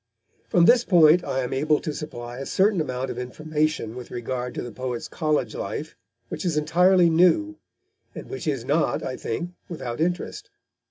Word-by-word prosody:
From 175 -1 +5
this 240 +3 +6
point 170 -3 +5
I 130 - -1
am 125 - -3
able 150 +3 +2
to 155 - -4
supply 120 -5 -7
a 135 - -5
certain 195 -2 +2
amount 130 -2 -3
of 125 - -6
information 150 -1 -2
with 125 -1 -8
regard 125 +1 -4
to - - -3
the 120 - -7
poet's 125 0 -4
college 150 -8 -1
life - - -5 0.3
which - - -5
is 170 -4 0
entirely 180 +3 +4
new, 180 - +3 0.6
and - - -8
which 400 - -6
is 135 -6 -1
not, 150 +4 +1
I 130 - -3
think, 170 +11 -4 0.2
without 130 -7 -5
interest. 175 +2 -2
150 Hz, 175 wpm, -24 LUFS, 125-175 Hz, 0.6 s, this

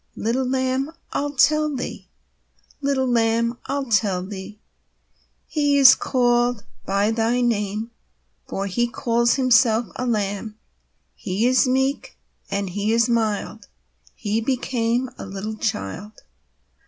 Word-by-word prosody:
Little 250 +3 -1
Lamb, 260 +1 0 0.2
I'll 290 0 -2
tell 305 +2 +3
thee; 255 - -6 0.7
Little 275 -2 +1
Lamb, 235 -1 +1
I'll 275 +1 -2
tell 205 -6 +1
thee: 200 +1 -8 0.9
He 290 -2 +1
is 265 -2 +9
called 240 -3 +1 0.2
by 200 +2 +1
thy 230 +2 +1
name, 215 -1 -1 0.6
For 195 - -3
He 240 +5 0
calls 235 0 +1
Himself 245 -4 +3
a 250 - -2
Lamb 210 -1 -2 0.6
He 195 +5 -2
is 255 +1 +4
meek, 265 +2 -1 0.3
and 200 -1 -2
He 205 +3 -1
is 230 0 +3
mild, 220 -2 -1 0.5
He 215 +1 -1
became 245 0 -1
a - - -6
little 200 +3 -5
child. 205 - -4
235 Hz, 120 wpm, -22 LUFS, 210-255 Hz, 0.9 s, is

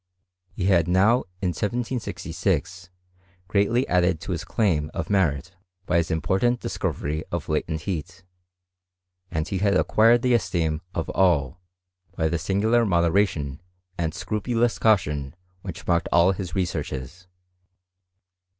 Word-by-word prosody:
He 90 - -2
had 85 -4 +3
now, 100 +8 +3 0.2
in 90 - +2
1766, 95 - -2 0.6
greatly 115 +7 +2
added 90 -2 +2
to 95 - -5
his 85 -3 -2
claim 85 -8 0
of - - -3
merit 85 -6 +1 0.3
by 90 - +1
his 85 -1 +1
important 95 +9 +1
discovery 75 -6 -3
of 85 -3 -3
latent 80 0 -1
heat; 90 +1 -5 1.1
and 80 0 -2
he 95 - -2
had 100 0 +2
acquired 115 +5 +4
the 125 -1 +3
esteem 85 -7 0
of 85 - -2
all 85 -8 +2 0.6
by 80 - +1
the 85 0 -1
singular 110 +6 +2
mo 85 -5 +2
deration 80 -7 0 0.4
and 80 -2 -2
scrupulous 115 +4 -1
caution 75 -9 +1 0.3
which 90 -3 -8
marked 85 -1 +1
all 85 +2 +5
his 90 -3 -5
researches. 85 -2 -4
90 Hz, 130 wpm, -24 LUFS, 80-100 Hz, 1.1 s, all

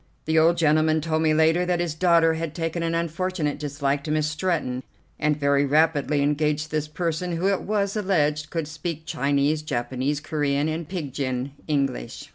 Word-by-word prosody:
The 160 0 +3
old 165 +2 +4
gentleman 155 0 +3
told 160 0 -1
me 160 -1 +3
later 160 +3 +3
that 180 -1 0
his 175 -3 -1
daughter 165 -1 +4
had 160 -1 -4
taken 165 0 -2
an 165 0 -1
unfortunate 170 -2 -2
dislike 145 -1 -1
to - - -4
Miss 155 0 +1
Stretton, 155 -5 -1 0.4
and 150 -1 +2
had - - -13
very 140 0 +3
rapidly 150 0 +2
engaged 150 +1 0
this 155 -1 -1
person, 170 +2 -2
who, 175 +4 0
it 195 - 0
was, 200 -1 -1
alleged, 155 -7 +1
could 165 -3 -3
speak 160 +1 -5
Chinese, 145 +1 +1
Japanese, 130 0 -2
Corean, 145 -2 0
and 160 0 -4
pidgin 140 -6 -3 0.2
English. 140 - -2
155 Hz, 175 wpm, -24 LUFS, 145-165 Hz, 0.4 s, old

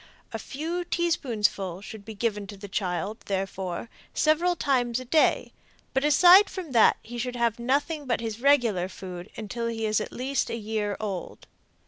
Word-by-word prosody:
A - - -3
few 330 +6 -4
teaspoonfuls 215 - -1
should 220 -2 -9
be 220 -1 -8
given 205 -2 -2
to 200 - -9
the 205 +1 -8
child, 195 +2 -2
therefore, 190 0 -3 0.3
several 335 +3 +3
times 250 -6 +1
a 255 - -8
day, 310 +5 +2 0.4
but 265 +1 +1
aside 355 +7 +7
from 360 -7 -6
that 230 -3 +5
he 240 +1 -7
should 250 +1 -3
have 235 -1 0
nothing 285 +4 0
but 240 - +1
his 225 0 -5
regular 235 -10 +3
food 180 -2 -8
until 230 +2 -4
he 225 -1 -2
is 215 0 +1
at - - -5
least 265 +2 -1
a - - -3
year 210 -2 -2
old. 195 -5 -5
230 Hz, 170 wpm, -26 LUFS, 205-280 Hz, 0.4 s, aside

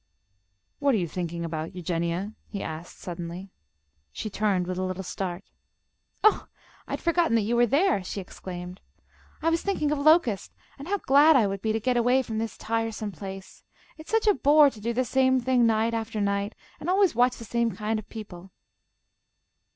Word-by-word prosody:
"What 280 -3 +3
are - - +2
you 175 -4 -1
thinking 170 0 -4
about, 160 +2 -5
Eugenia?" 175 +3 -2
he 200 - -5
asked, 160 +2 -7
suddenly. 175 +2 -7 0.6
She 210 - -5
turned 200 -3 +1
with 185 0 -3
a - - -1
little 185 +1 -3
start. 185 0 -4 0.8
"Oh, 430 - +4 0.4
I - - -5
had - - -2
forgotten 335 -7 +2
that 225 - +4
you 230 +4 0
were 240 0 +4
there!" 290 - +2
she 190 - -5
exclaimed. 180 -1 -8 0.6
"I 330 - +3
was 330 - +1
thinking 345 -7 0
of 300 - 0
Locust, 285 - +3 0.3
and 280 - -8
how 405 +2 +1
glad 295 -1 +5
I 240 -5 +5
would 195 -1 -3
be 220 - 0
to 220 - 0
get 245 +3 +1
away 250 +2 +3
from 220 -3 -4
this 225 0 -4
tiresome 225 -2 -2
place. 195 +1 -9 0.3
It's 315 0 -13
such 450 0 +2
a 420 - +6
bore 295 -3 +5
to 215 - -13
do 230 +3 -1
the 255 +2 0
same 260 +1 +3
thing 250 -1 +3
night 225 +1 +1
after 225 -1 -3
night, 200 +1 -1 0.2
and 330 - -4
always 380 -1 +4
watch 245 +2 +2
the 230 - -9
same 235 +1 0
kind 215 +1 -2
of 215 - -12
people." 195 -5 -9
220 Hz, 190 wpm, -26 LUFS, 190-260 Hz, 0.8 s, a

